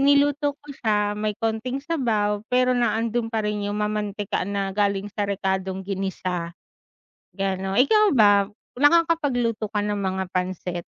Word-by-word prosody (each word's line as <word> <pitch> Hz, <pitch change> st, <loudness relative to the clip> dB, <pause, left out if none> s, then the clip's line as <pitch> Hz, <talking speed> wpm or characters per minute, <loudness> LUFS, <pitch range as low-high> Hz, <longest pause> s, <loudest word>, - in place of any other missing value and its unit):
niluto 285 Hz, +1 st, +3 dB
ko 295 Hz, -, -25 dB
siya 210 Hz, -4 st, 0 dB
may 210 Hz, 0 st, -2 dB
konting 225 Hz, +4 st, -2 dB
sabaw 215 Hz, -10 st, 0 dB
pero 255 Hz, 0 st, +3 dB
naandun 230 Hz, -1 st, 0 dB
pa 220 Hz, -2 st, -2 dB
rin 210 Hz, -1 st, -2 dB
yung 205 Hz, -, -2 dB
mamantikan 210 Hz, -2 st, -2 dB
na 195 Hz, -1 st, -2 dB
galing 200 Hz, 0 st, 0 dB
sa 205 Hz, -1 st, -2 dB
rekadong 190 Hz, -1 st, -2 dB
ginisa, 185 Hz, -3 st, -3 dB, 0.8 s
gano'n. 195 Hz, +1 st, -1 dB
Ikaw 425 Hz, +11 st, +5 dB
ba, 205 Hz, -4 st, +4 dB, 0.2 s
nakakapagluto 285 Hz, -8 st, +2 dB
ka 210 Hz, -, 0 dB
ng 205 Hz, 0 st, -1 dB
mga 190 Hz, -1 st, -1 dB
pancit? 180 Hz, -1 st, -2 dB
210 Hz, 135 wpm, -24 LUFS, 195-245 Hz, 0.8 s, Ikaw